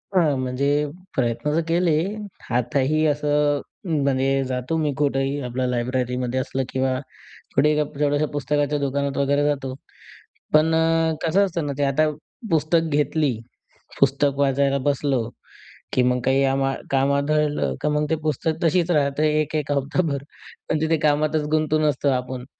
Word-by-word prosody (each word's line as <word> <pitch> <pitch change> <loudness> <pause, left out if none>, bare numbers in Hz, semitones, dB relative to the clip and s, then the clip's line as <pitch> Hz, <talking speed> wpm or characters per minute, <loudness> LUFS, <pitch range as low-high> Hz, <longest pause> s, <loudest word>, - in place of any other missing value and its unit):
हां, 160 -6 +3
म्हणजे 130 +2 -1 0.5
प्रयत्न 120 +3 0
तर 165 - +2
केले. 170 +1 +2 0.6
आताही 140 +5 +1
असं 145 -1 +1 0.4
म्हणजे 135 0 +1
जातो 130 +5 -2
मी 155 -2 0
कुठेही 140 -1 0
आपल्या 125 0 -2
लायब्ररीमध्ये 125 +1 -1
असलं 130 0 -2
किंवा 130 -1 0 0.6
कुठेही 150 +3 +4
जेवढ्याशा 145 0 0
पुस्तकाच्या 145 +1 0
दुकानात 140 0 -1
वगैरे 140 +1 +2
जातो. 135 -3 -1 0.8
पण 155 +1 +4
अ, 165 0 +2
कसं 190 +5 +3
असतं 170 -4 -3
ना, 140 - -2
ते 145 - 0
आता 155 +3 +2 0.4
पुस्तक 160 +1 +2
घेतली, 150 -1 +1 0.7
पुस्तक 140 +1 +2
वाचायला 140 0 +2
बसलो, 140 -3 +1 0.7
की 125 - +3
मग 125 - -1
काही 135 +1 +3
आम 135 0 0 0.3
काम 135 +1 +2
आढळलं 145 - 0
का - - +1
मग 150 0 0
ते 160 - +2
पुस्तक 155 +2 -1
तशीच 170 +1 +2
राहतात, 145 -2 +1
एक-एक 150 -1 0
हप्ताभर. 140 +1 0 0.5
पण 155 - 0
तिथे 160 0 +2
कामातच 150 +1 +1
गुंतून 155 0 +1
असतो 140 0 0
आपण. 125 -1 -2
145 Hz, 140 wpm, -23 LUFS, 135-155 Hz, 0.8 s, कुठेही